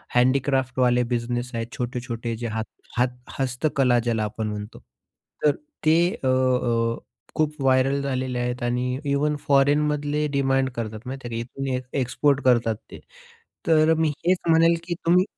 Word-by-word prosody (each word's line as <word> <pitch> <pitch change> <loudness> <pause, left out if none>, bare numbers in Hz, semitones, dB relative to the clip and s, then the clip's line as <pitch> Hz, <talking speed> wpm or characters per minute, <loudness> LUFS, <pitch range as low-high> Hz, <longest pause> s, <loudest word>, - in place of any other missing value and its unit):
हँडीक्राफ्टवाले 130 -1 +2
business 120 +1 -2
आहेत 115 0 -3
छोटे-छोटे 120 -2 -3
जे - - -1
हात 110 -1 -2 0.3
हात 125 0 +1 0.2
हस्तकला 130 -1 +2
ज्याला 110 -2 +1
आपण 105 +1 -3
म्हणतो. 105 0 -6 0.6
तर 150 -1 +4 0.3
ते 155 +1 +5 0.3
अ, - - +1
अ, 125 -3 +2 0.4
खूप 155 -1 0
व्हायरल 135 +1 +3
झालेले 130 -2 -2
आहेत 125 0 -2
आणि 125 +2 -1
इव्हन 145 +1 +1
फॉरेनमधले 145 +1 +2
डिमांड 135 -1 +2
करतात 110 -2 -4
माहिती 130 -1 -6
आहे 115 -1 -4
का. 120 - -16
इथून 135 - -2
ए 125 - -1 0.2
एक्सपोर्ट 140 +2 +1
करतात 120 -3 +3 0.2
ते. - - -9 0.7
तर 160 0 +5
मी 160 - +3 0.2
हेच 180 0 +4
म्हणेल 165 +1 +5
की 175 - -1
तुम्ही 180 +2 +5
130 Hz, 150 wpm, -24 LUFS, 120-140 Hz, 0.7 s, ते